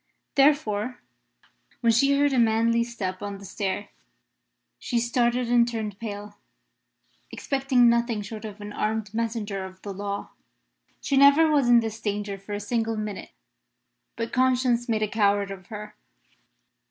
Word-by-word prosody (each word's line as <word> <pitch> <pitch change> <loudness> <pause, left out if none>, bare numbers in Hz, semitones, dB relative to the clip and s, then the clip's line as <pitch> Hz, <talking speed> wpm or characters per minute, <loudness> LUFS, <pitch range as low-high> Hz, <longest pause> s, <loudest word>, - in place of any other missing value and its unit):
Therefore, 255 -5 +2 0.8
when 230 -2 +4
she 275 +5 +4
heard 285 0 +3
a 255 - +3
manly 230 +1 +3
step 205 -6 -5
on 200 -1 -5
the 200 - -12
stair, 200 +1 -3 0.9
she 245 - -2
started 240 +1 +1
and 240 -1 +5
turned 220 -4 -4
pale, 205 -2 -7 0.9
expecting 270 -3 +2
nothing 235 -2 +1
short 215 +1 -8
of 210 -1 -8
an 205 0 -7
armed 215 -1 -2
messenger 220 -4 -2
of 185 0 -10
the 200 - -5
law. 200 +1 -5 0.7
She 275 - 0
never 285 +3 +6
was 280 -5 +3
in 240 -1 +7
this 225 0 -5
danger 205 -1 -3
for 195 +2 -8
a 205 - -2
single 225 +1 -1
minute, 210 -2 -5 0.9
but 230 0 -4
conscience 250 -1 +2
made 215 -1 +1
a - - +1
coward 205 -1 +1
of 185 -2 -9
her. 210 -1 -8
225 Hz, 150 wpm, -25 LUFS, 205-240 Hz, 0.9 s, in